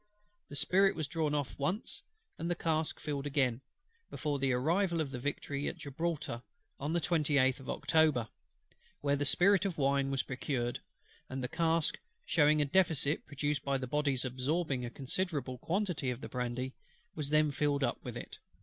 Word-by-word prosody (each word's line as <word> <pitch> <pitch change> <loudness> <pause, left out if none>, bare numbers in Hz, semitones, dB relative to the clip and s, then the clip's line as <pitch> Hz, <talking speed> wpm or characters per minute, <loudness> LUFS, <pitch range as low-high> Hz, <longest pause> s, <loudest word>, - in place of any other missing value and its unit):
The 145 - -8
spirit 195 +6 +4
was 155 -1 -1
drawn 150 0 0
off 145 -2 -3
once, 180 +10 -2 0.4
and 170 - -2
the 175 - +1
cask 160 -2 0
filled 145 -1 -3
again, 135 -4 +1 0.5
before 145 -2 -2
the 135 -1 +2
arrival 170 +7 +2
of 150 -4 -1
the 125 - -4
Victory 140 +1 -2
at - - -3
Gibraltar 150 -4 -3 0.4
(on 145 +3 -2
the 175 - +3
28th 145 -6 +2
of 135 - -10
October): 155 -8 +3 0.7
where 145 0 +1
spirit 180 +7 +5
of 195 -4 -2
wine 140 -1 +2
was 135 -1 0
procured; 125 -2 -2 0.5
and 130 0 -4
the - - 0
cask, 165 +2 +1 0.3
shewing 150 -1 +4
a - - 0
deficit 155 -2 +2
produced 145 -1 -1
by 140 -1 +1
the 130 - -3
Body's 140 -1 +1
absorbing 130 +2 -1
a 120 - -3
considerable 135 -1 -2
quantity 180 -7 -1
of 125 +1 -3
the - - -6
brandy, 125 +1 -2 0.4
was 150 -3 -4
then 155 0 +4
filled 145 0 +1
up - - -1
with - - -5
it. - - -8
145 Hz, 170 wpm, -33 LUFS, 135-160 Hz, 0.7 s, spirit